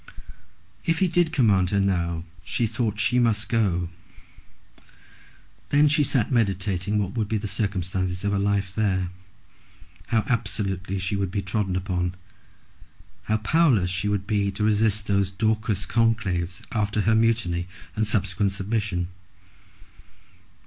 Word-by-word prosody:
If 165 0 +1
he 190 - +3
did 175 -1 +2
command 100 -8 +3
her 100 - +1
now 85 -4 0 0.2
she 120 - -1
thought 110 -1 -1
that 105 - -2
she 125 +2 +2
must 115 -3 +1
go. 95 -8 +1 1.8
Then 145 +1 +5
she 150 +1 +3
sat 130 -4 +1
meditating 100 -3 0
what 100 -3 -1
would 110 -4 -1
be 110 - +1
the 105 - -5
circumstances 95 -3 -2
of 100 - +1
her 100 - +1
life 100 -1 0
there, 95 -4 0 1.0
how 115 -2 +2
absolutely 95 -4 -1
she 95 +2 -2
would 100 -2 -1
be 100 +2 -2
trodden 95 0 -1
upon; 90 -1 -1 1.1
how 110 - +1
powerless 110 - +3
she 95 +3 -1
would 100 -1 -1
be 100 -1 +1
to 105 +2 -3
resist 105 -1 +2
those 100 -2 +1
Dorcas 105 0 0
conclaves 100 -7 0
after 105 -1 0
her 110 +3 +3
mutiny 110 -6 +1 0.3
and 110 0 0
subsequent 100 -1 +1
submission! 100 -3 -2
100 Hz, 140 wpm, -25 LUFS, 95-110 Hz, 1.8 s, Then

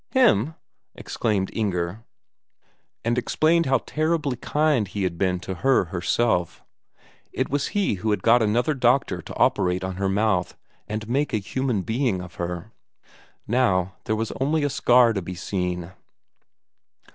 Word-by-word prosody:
"Him!" 160 - +3 0.4
exclaimed 100 -4 -2
Inger, 95 -1 -2 1.0
and 120 +1 +2
told 165 +2 +2
how 135 0 +4 0.6
kind 150 -8 +1
he 100 +1 -4
had 85 -2 -2
been 90 -2 +1
to 95 - -5
her 125 +3 +2
herself; 90 0 0 0.7
it - - -2
was 140 0 0
he 200 - +2
who 110 - -1
had 105 - 0
got 120 +1 +5
another 120 +7 +2
doctor 125 -1 +1
to - - -10
operate 90 0 +2
on 95 -1 -4
her 95 0 0
mouth 95 -2 0 0.3
and 105 0 -4
make 140 +4 0
a - - +3
human 115 0 -2
being 115 -3 0
of 90 -1 -9
her. 85 +4 -4 0.8
Now 95 -7 +1
there 110 - 0
was 110 0 -2
only 150 +3 +1
a 145 - 0
scar 120 -2 +4
to 100 - -2
be 90 +1 -6
seen. 90 -1 -3
110 Hz, 145 wpm, -24 LUFS, 95-130 Hz, 1.0 s, got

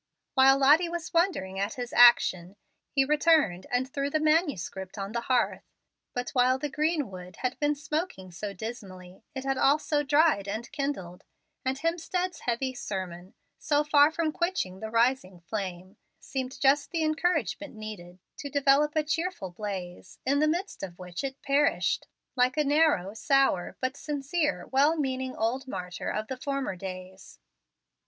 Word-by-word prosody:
While 270 0 +6
Lottie 300 +6 +5
was 340 -1 -5
wondering 265 - +1
at 200 +1 -2
his 245 -1 -5
action, 195 -6 +5 0.3
he 270 -1 +2
returned 300 - +3
and 250 +1 0
threw 275 +1 -2
the 310 - 0
manuscript 290 - 0
on 195 0 -4
the 235 +1 -2
hearth. 245 0 +1 0.5
But 245 0 -3
while 255 0 +3
the 290 +1 -4
green 305 - 0
wood 180 -1 -9
had 255 0 -2
been 295 0 +1
smoking 300 - -4
so 200 +4 -5
dismally, 190 -3 -8
it 265 - -4
had 270 -1 -1
also 295 +1 +3
dried 290 -7 +3
and 220 +4 -5
kindled; 235 - -4 0.4
and 260 +1 -1
Hemstead's 345 +3 -2
heavy 255 +2 -1
sermon, 185 -5 -6 0.2
so 295 -1 +2
far 295 0 +5
from 320 -1 -1
quenching 345 - -2
the 220 - -5
rising 230 -5 +1
flame, 185 +1 -6 0.2
seemed 260 -1 -5
just 280 +1 +3
the 330 -2 -1
encouragement 310 - -1
needed 205 -5 -8 0.2
to 285 - -6
develop 285 +2 +3
a 310 - +2
cheerful 325 - -2
blaze, 185 -2 -6
in 280 +2 +2
the 305 - +3
midst 350 +6 -2
of 180 -3 -7
which 180 +5 -6
it 270 0 -5
perished, 280 +1 +1 0.3
like 255 +2 +2
a 300 - +3
narrow, 290 - +2
sour, 270 - +1
but 255 +1 -2
sincere, 295 +2 -2
well 285 +5 +4
meaning 260 -3 -2
old 255 +5 -1
martyr 180 -6 -5
of 215 +1 -3
former 275 -7 -2
days. 185 0 -9
265 Hz, 155 wpm, -28 LUFS, 195-300 Hz, 0.5 s, While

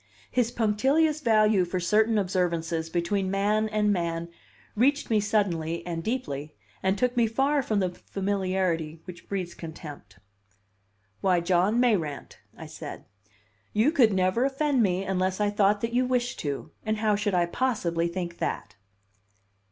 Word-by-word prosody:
His 245 -2 +2
punctilious 270 +8 +2
value 215 -5 +4
for 180 +1 -2
certain 215 +5 +2
observances 170 -4 -1
between 185 +3 -1
man 210 +3 +1
and 210 -1 +2
man 170 -2 -2 0.5
reached 275 +4 +2
me 215 - +4
suddenly 175 -6 0
and 165 -2 -4
deeply, 155 - -3 0.3
and 190 +1 +1
took 250 +3 +1
me 235 -2 +3
far 275 +6 +1
from 215 -5 0
the 185 -1 0
familiarity 185 -5 -2
which 180 -2 -11
breeds 185 -3 -3
contempt. 150 - -10 1.0
"Why, 185 -2 +3
John 185 +6 +2
Mayrant," 185 - 0 0.2
I - - -8
said, - - -8 0.7
"you 220 +8 +3
could 250 -9 +4
never 185 +5 +2
offend 275 -1 +1
me 190 -2 +1
unless 190 0 -1
I 205 0 +1
thought 205 0 +2
that 230 0 -2
you 250 +1 +2
wished 245 -1 -1
to, 140 -2 -4
and 215 0 -1
how 215 -1 +2
should 205 -2 0
I 175 -1 +3
possibly 170 -5 0
think 170 -1 -5
that?" 105 -1 -3
195 Hz, 150 wpm, -27 LUFS, 175-225 Hz, 1.0 s, value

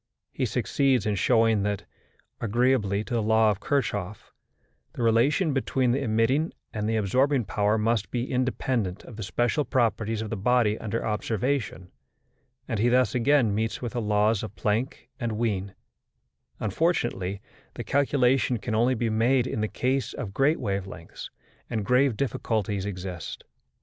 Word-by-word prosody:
He - - -1
succeeds 135 -5 +1
in 105 - +1
showing 115 +1 +3
that, 100 0 -2 0.5
agreeably 115 -3 +1
to 120 - -7
the 115 - +1
law 110 0 +4
of 100 - -4
Kirchhoff, 105 -7 -2 0.6
the 120 - -3
relation 135 - +3
between 130 -2 +1
the 135 +3 0
emitting 125 +7 +1 0.2
and 105 0 -2
the 115 - 0
absorbing 125 +5 +2
power 105 +3 +1
must 110 -1 0
be 120 +1 -3
independent 125 -6 -1
of 120 - -11
the 110 - -7
special 120 - 0
properties 115 -4 0
of 110 - -7
the - - -1
body 110 +1 +2
under 110 +1 -3
observation, 110 -2 -2 0.8
and 115 -4 -2
he 120 +3 +3
thus 125 -2 +3
again 125 -3 +3
meets 110 +2 -1
with 120 -3 -5
the 120 - -1
laws 105 0 +2
of 105 - -7
Planck 115 +5 -2
and 115 -2 -2
of - - -4
Wien: 100 -4 -2 0.8
unfortunately 105 - -1 0.4
the - - -5
calculation 135 -3 +2
can 110 +1 -4
only 120 +4 +3
be 115 -1 -1
made 120 +3 +2
in 110 - -3
the 110 - 0
case 130 +4 -1
of 105 -8 -6
great 145 +7 +2
wave 100 -5 -2
lengths, 85 -3 -9 0.4
and 110 -3 -2
grave 125 0 +3
difficulties 105 -6 -1
exist. 90 -4 -6
115 Hz, 160 wpm, -26 LUFS, 105-125 Hz, 0.8 s, law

